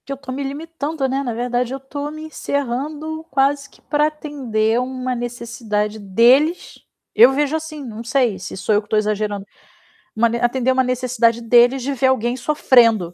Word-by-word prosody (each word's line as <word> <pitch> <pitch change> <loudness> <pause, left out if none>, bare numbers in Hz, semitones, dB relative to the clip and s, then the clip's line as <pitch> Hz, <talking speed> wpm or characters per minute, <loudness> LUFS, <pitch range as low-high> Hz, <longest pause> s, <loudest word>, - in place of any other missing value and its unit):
Que - - -7
eu - - -7
tô 270 -1 -9
me 275 +2 -4
limitando, 300 0 -4
né, 265 +1 -1
na 245 -4 -3
verdade, 245 +1 -2
eu 270 - -4
tô 285 +2 -6
me 310 +1 -8
encerrando 300 +2 -4
quase 280 +1 +1
que - - -23
pra 295 0 +1
atender 255 -8 -1
uma 255 0 -3
necessidade 235 -3 -3
deles. 245 - +2 0.3
Eu 235 +4 +7
vejo 290 +2 0
assim, 310 -2 -5
não 225 -1 -7
sei 240 -4 +1
se 190 - -7
sou 195 +3 0
eu 205 - +3
que 210 - -23
tô 215 - +1
exagerando, 210 -1 -1 0.7
mane 235 +1 +2
atender 245 +1 +1
uma 260 0 +2
necessidade 250 -2 +1
deles, 240 +2 +4
de 280 +2 -2
ver 260 0 +1
alguém 245 -2 +1
sofrendo. 235 - +3
255 Hz, 180 wpm, -20 LUFS, 230-280 Hz, 0.7 s, Eu